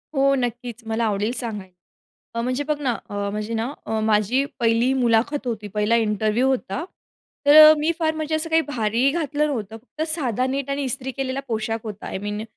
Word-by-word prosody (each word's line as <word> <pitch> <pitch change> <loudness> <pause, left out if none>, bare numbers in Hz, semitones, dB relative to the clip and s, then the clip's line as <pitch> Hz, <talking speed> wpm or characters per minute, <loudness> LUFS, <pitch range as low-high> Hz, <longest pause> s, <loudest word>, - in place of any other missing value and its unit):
हो, 275 0 +4
नक्कीच. 245 -1 -4
मला 225 +1 -1
आवडेल 210 +1 0
सांगायला. 210 -6 -6 0.6
अ, 230 - -1
म्हणजे 255 +4 -1
बघ 300 0 -1
ना 265 -4 +1 0.2
अ, - - -8 0.2
म्हणजे 210 +2 -4
ना 230 +4 -2
अ, 220 0 -1
माझी 220 +4 +2 0.2
पहिली 230 +2 +3
मुलाखत 250 +3 +1
होती. 215 -3 -3
पहिला 210 +2 +2
इंटरव्ह्यू 220 +2 +1
होता. 265 +2 -1 0.6
तर 290 +1 +7
अ, - - +9
मी 305 +2 +1
फार 315 -2 +1
म्हणजे 310 0 -2
असं 315 +1 -1
काही 325 0 +4
भारी 235 0 +1
घातलं 300 -1 0
नव्हतं. 225 -7 -4
फक्त 255 +7 -8
साधा 255 -6 0
नीट 275 +1 -3
आणि 280 +1 -1
इस्त्री 265 0 -3
केलेला 270 0 -3
पोशाख 225 0 -2
होता. 210 -2 -7
I - - -4
mean 205 +2 -4
245 Hz, 190 wpm, -23 LUFS, 220-275 Hz, 0.6 s, अ